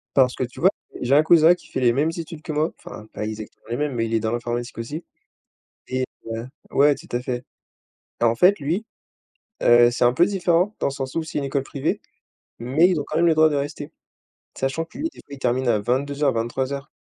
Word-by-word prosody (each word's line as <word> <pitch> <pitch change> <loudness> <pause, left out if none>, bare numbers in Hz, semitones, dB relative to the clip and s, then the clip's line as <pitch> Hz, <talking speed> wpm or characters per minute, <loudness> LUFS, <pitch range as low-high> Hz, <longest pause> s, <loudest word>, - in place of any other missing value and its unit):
Parce 130 -2 +4
que, - - -2
tu 120 - -7
vois, 185 - +6 0.3
j'ai 130 +3 +3
un 150 - +6
cousin 165 +1 +6
qui - - -18
fait - - -3
les 120 -2 +4
mêmes 150 +5 +1
études 165 -1 -7
que 160 - -6
moi, 155 +2 0
enfin, 105 - -10
pas 105 - -4
exactement 110 0 -8
les 120 - -2
mêmes, 145 -1 -1
mais 115 -1 0
il 115 - -4
est 115 - +3
dans 110 0 -1
l'informatique 120 0 -3
aussi 145 +9 -5 0.8
et 130 0 -1 0.3
heu, 115 +2 -4 0.2
ouais, 145 +1 +5
tout 160 +6 -14
à 120 - 0
fait 125 -1 -3 0.8
et - - +4
en 115 0 +3
fait, 185 - +5
lui, 165 +10 -1 0.8
heu, 120 0 +6
c'est 120 - 0
un 120 0 +4
peu 170 - +5
différent. 185 +1 +1
Dans - - +1
le - - +1
sens 135 -1 -5
où 165 - 0
c'est 155 - -7
une 145 - -2
école 135 0 -1
privée, 140 +1 -2 0.6
mais 135 +9 +3
ils 175 -5 +1
ont 145 - -4
quand - - -5
même 170 - +3
le 165 - +5
droit 155 0 +5
de 145 - -1
rester. 145 +1 -3 0.7
Sachant 135 +5 -1
que 215 +9 -14
lui, 300 - -3
des - - -18
fois, - - -13
il - - -15
termine 125 0 +1
à 110 -3 +3
22:00-23:00. 135 +2 -1
140 Hz, 235 wpm, -23 LUFS, 120-160 Hz, 0.8 s, vois